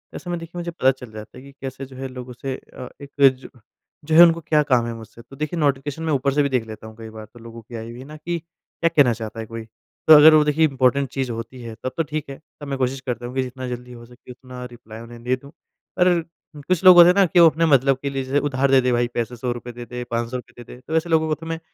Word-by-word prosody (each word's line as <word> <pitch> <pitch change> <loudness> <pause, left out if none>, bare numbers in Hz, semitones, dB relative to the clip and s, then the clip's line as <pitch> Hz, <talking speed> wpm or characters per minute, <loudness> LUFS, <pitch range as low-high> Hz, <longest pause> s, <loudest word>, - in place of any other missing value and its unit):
ऐसे 175 - -8
में 175 - -2
देखिए 165 +1 -8
मुझे 170 0 -4
पता 135 -6 +2
चल 125 -3 -11
जाता 110 +2 -11
है 130 - -12
कि 140 - -13
कैसे 135 0 -6
जो 130 0 -14
है 135 +1 -5
लोगों 125 -1 -9
से 130 +2 -5
अ, 125 - -11
एक 140 -1 -11
ज 130 -1 +4 0.6
जो 155 +1 0
है 165 - +9
उनको 170 -1 +4
क्या 155 -1 +2
काम 125 -3 +3
है 120 - -4
मुझसे। 115 +1 -12
तो 120 +3 -15
देखिए 155 +4 -4
नोटिफिकेशन 145 +1 -1
मैं 160 -1 0
ऊपर 140 0 0
से 145 +1 +2
भी 140 - 0
देख 125 -4 0
लेता 110 0 -10
हूँ 110 - -12
कई 115 -1 -9
बार 110 0 -10
तो 120 - -14
लोगों 115 0 -11
की 115 +2 -12
आई 115 0 -7
हुई 120 - -11
है 130 - -10
ना 150 +2 -11
कि 170 +3 -4
क्या 165 0 -5
कहना 145 -7 +4
चाहता 110 0 -7
है 110 - -5
कोई? 115 0 -8 0.4
तो 160 - +10
अगर 155 +1 +9
वो 155 -1 +6
देखिए 150 +2 +1
इम्पोर्टेंट 135 0 +1
चीज़ 135 -2 -3
होती 115 +2 -7
है 115 -1 -8
तब 130 - -2
तो 165 - +1
ठीक 150 -1 -5
है। 135 - -8 0.2
तब 145 - -8
मैं 135 -1 -3
कोशिश 130 +1 -2
करता 120 -2 -5
हूँ 125 +1 -7
कि 130 - +1
जितना 130 0 -7
जल्दी 125 0 -7
हो 120 -1 -12
सके 125 +1 -15
उतना 125 0 -10
रिप्लाई 110 -2 -12
उन्हें 115 0 -12
दे 125 +1 +1
दूँ। 140 +2 -15 0.5
पर 180 -1 +4 0.5
कुछ 185 -2 0
लोग 185 -1 +9
होते 175 0 +10
हैं - - +5
ना 200 -1 +5
कि 175 0 +2
वो 170 -1 +8
अपने 165 +2 0
मतलब 135 -3 +3
के 140 - -2
लिए 135 -1 -3
जैसे 135 +2 0
उधार 140 -1 0
दे 135 -1 +6
दे 125 0 0
भाई 120 0 +1
पैसे 120 +1 -3
100 120 +1 -3
रुपए 120 0 -7
दे 120 0 -9
दे, 125 +1 -6
500 120 +1 -4
रुपए 125 0 -12
दे - - -13
दे। - - -15
तो 160 - -3
ऐसे 160 +1 -2
लोगों 160 -1 +2
को 155 - 0
तो 165 - -12
मैं 165 0 -4
130 Hz, 300 wpm, -22 LUFS, 120-150 Hz, 0.6 s, तो